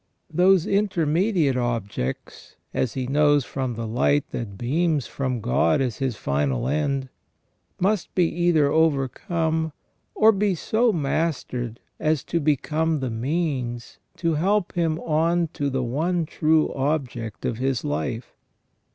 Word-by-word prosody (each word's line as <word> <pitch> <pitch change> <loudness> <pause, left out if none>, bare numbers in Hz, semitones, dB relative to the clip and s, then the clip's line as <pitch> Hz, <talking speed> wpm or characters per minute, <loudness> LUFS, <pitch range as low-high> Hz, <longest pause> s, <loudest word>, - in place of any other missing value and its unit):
Those 180 +1 +4
intermediate 180 - +1
objects, 115 - -3 0.2
as 125 - -1
he 130 -1 -2
knows 145 0 +3
from 130 -3 -3
the 115 +1 -4
light 130 +6 +1
that 100 -5 -5
beams 150 - 0
from 130 -4 -3
God 125 +6 +2
as 125 -5 -1
his 130 -4 -1
final 70 - -1
end, 140 -2 -1 0.7
must 195 0 0
be 180 - +4
either 170 -3 +2
overcome 160 - 0 0.4
or 220 +1 +6
be 200 -2 +1
so 225 +7 +2
mastered 135 - -2 0.2
as 155 -3 +1
to 170 - -1
become 155 +1 +1
the 130 -3 -3
means 125 -2 -2 0.2
to 170 -1 0
help 190 +5 +1
him 165 -3 0
on 165 +2 +1
to 145 -1 -2
the 130 -1 -1
one 160 +8 0
true 155 0 +2
object 130 -6 -2
of 115 - -2
his 130 -2 0
life. 130 -5 -3
150 Hz, 135 wpm, -24 LUFS, 125-165 Hz, 0.7 s, or